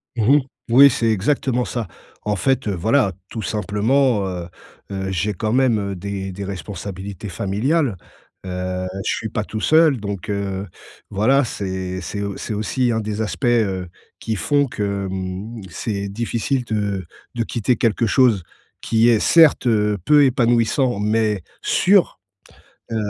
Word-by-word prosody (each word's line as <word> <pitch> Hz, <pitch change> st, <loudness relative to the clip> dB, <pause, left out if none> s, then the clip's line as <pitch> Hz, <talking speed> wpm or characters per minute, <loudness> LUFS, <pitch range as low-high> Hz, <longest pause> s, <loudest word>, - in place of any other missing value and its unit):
Mmh 120 Hz, +5 st, +4 dB
mh. -, -, +2 dB, 0.3 s
Oui, 140 Hz, +4 st, +8 dB
c'est 115 Hz, -2 st, 0 dB
exactement 125 Hz, +4 st, +1 dB
ça. 115 Hz, -5 st, -4 dB, 0.4 s
En 105 Hz, -1 st, 0 dB
fait, 130 Hz, +2 st, 0 dB
heu, 100 Hz, -, 0 dB
voilà, 110 Hz, +2 st, +2 dB, 0.2 s
tout 110 Hz, -1 st, -5 dB
simplement, 105 Hz, +3 st, +1 dB
heu 90 Hz, -2 st, -5 dB, 0.4 s
heu, 95 Hz, -1 st, -3 dB
j'ai 95 Hz, +3 st, -1 dB
quand 110 Hz, +5 st, -2 dB
même, 125 Hz, -4 st, +3 dB
heu, -, -, -4 dB
des 95 Hz, +1 st, -5 dB
des 100 Hz, +2 st, -6 dB
responsabilités 100 Hz, 0 st, -6 dB
familiales, 110 Hz, -, 0 dB, 0.5 s
heu, 90 Hz, 0 st, -3 dB, 0.2 s
je -, -, +1 dB
suis 110 Hz, -, -4 dB
pas 105 Hz, -, -2 dB
tout 110 Hz, 0 st, -5 dB
seul, 155 Hz, -4 st, +4 dB
donc 100 Hz, 0 st, -5 dB
heu, 100 Hz, -1 st, -3 dB, 0.4 s
voilà, 125 Hz, +7 st, +3 dB
c'est 95 Hz, -3 st, -4 dB
c'est 100 Hz, -, -5 dB
au 100 Hz, -1 st, -3 dB
c'est -, -, -5 dB
aussi 120 Hz, +4 st, 0 dB
un 115 Hz, -, 0 dB
des 105 Hz, 0 st, -3 dB
aspects, 110 Hz, +4 st, -3 dB
heu, 100 Hz, -7 st, +1 dB, 0.3 s
qui 110 Hz, -, -2 dB
font 145 Hz, +10 st, +2 dB
que, 100 Hz, -5 st, -3 dB
mmh, 95 Hz, +4 st, -5 dB
c'est 100 Hz, -2 st, -4 dB
difficile 120 Hz, +4 st, -2 dB
de 100 Hz, -4 st, -2 dB, 0.3 s
de 115 Hz, -, 0 dB
quitter 120 Hz, +2 st, 0 dB
quelque 115 Hz, 0 st, +1 dB
chose 115 Hz, -6 st, +3 dB, 0.4 s
qui 115 Hz, +1 st, +3 dB
est 110 Hz, -3 st, +4 dB
certes, 160 Hz, -6 st, +5 dB
heu, 105 Hz, -2 st, +2 dB
peu 145 Hz, +5 st, +6 dB
épanouissant, 120 Hz, -1 st, +2 dB
mais 105 Hz, -3 st, +1 dB, 0.2 s
sûr, 190 Hz, -, +3 dB, 0.7 s
heu, -, -, -1 dB
105 Hz, 155 wpm, -21 LUFS, 100-120 Hz, 0.7 s, Oui